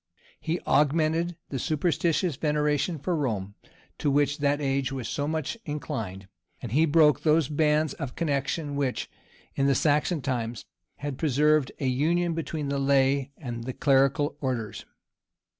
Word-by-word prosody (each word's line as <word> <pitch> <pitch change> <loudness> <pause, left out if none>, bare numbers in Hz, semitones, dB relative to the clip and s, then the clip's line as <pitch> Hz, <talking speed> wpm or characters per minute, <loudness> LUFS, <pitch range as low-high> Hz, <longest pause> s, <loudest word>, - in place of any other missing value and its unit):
He 165 +2 -2
augmented 160 +4 +2
the 135 - -3
superstitious 165 +2 0
veneration 150 +3 0
for 170 +5 -1
Rome, 105 -10 -2 0.5
to 145 - +1
which 145 +1 +2
that 145 0 +1
age 135 -2 0
was 130 -4 -4
so 145 +4 -2
much 160 - -3
inclined, 115 - -5 0.3
and 120 - -7
he 155 +6 +3
broke 150 -1 +4
those 155 -2 +3
bands 150 0 +2
of 135 -3 -6
connection 145 -1 -1
which, 140 -3 -2 0.4
in 140 - +1
the 140 - +3
Saxon 150 +2 +1
times, 120 -4 -3 0.3
had 145 -2 -5
preserved 150 -1 +3
a 140 - -2
union 165 +7 +1
between 160 -3 -3
the 140 0 -1
lay 135 0 +2
and 120 -5 -6
the 130 - -4
clerical 140 +1 +2
orders. 120 -6 -3
145 Hz, 145 wpm, -27 LUFS, 135-155 Hz, 0.5 s, broke